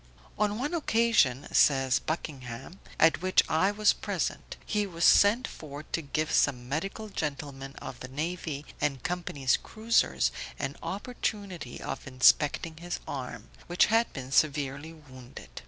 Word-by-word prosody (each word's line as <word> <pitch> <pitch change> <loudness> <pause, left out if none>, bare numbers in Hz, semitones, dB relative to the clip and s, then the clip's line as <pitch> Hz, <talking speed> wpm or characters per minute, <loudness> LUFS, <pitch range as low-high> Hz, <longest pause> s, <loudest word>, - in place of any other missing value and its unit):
On 210 0 +1
one 285 +7 -2
occasion 225 - +2
(says 135 -2 +4
Mr. - - -23
Buckingham), 135 -1 -5 0.2
at 160 0 +5
which 185 0 +4
I 175 +5 +3
was 210 +1 +3
present, - - -3
he 210 -1 0
was 170 -2 -1
sent 220 +5 +6
for 145 -1 -9
to 165 - -3
give 155 +1 -2
some 125 -4 +2
medical 195 - -3
gentlemen 140 -5 -5
of 120 - -8
the 130 - -7
navy 150 +1 -4 0.2
and 140 -4 -1
company's 165 -7 0
cruisers 70 - +1 0.3
an 135 - -3
opportunity 200 - -4
of - - -6
inspecting 145 +5 +3
his 175 +1 -5
arm, 130 -3 -6 0.2
which 175 +1 +4
had 230 +1 +3
been 130 -1 -7
severely 145 +1 +1
wounded. 130 -6 -13
155 Hz, 140 wpm, -29 LUFS, 135-190 Hz, 0.3 s, sent